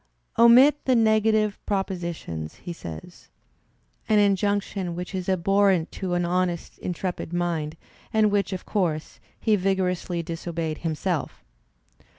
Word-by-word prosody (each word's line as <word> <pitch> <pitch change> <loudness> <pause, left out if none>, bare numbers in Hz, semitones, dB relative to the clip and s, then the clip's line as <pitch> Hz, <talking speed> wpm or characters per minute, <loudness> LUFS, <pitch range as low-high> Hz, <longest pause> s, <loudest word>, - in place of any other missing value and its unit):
"Omit 255 +5 +7
the 260 - +3
negative 220 -2 +3
propositions," 170 - -3
he 175 - -7
says 80 - -10 0.4
— - - -35
an 215 - +4
injunction 200 -2 +1
which 180 +2 -6
is 185 0 -3
abhorrent 190 -1 +2
to 180 -2 -3
an 175 0 +1
honesty 175 -1 -2
intrepid 180 -1 -3
mind, 170 -3 -2 0.3
and 215 -1 +3
which, 200 0 +1
of 185 - -5
course, 165 -6 -2 0.2
he 220 -2 +3
vigorously 180 -3 -1
disobeyed 165 -1 -4
himself! 165 +1 -3
185 Hz, 125 wpm, -25 LUFS, 170-205 Hz, 0.4 s, Omit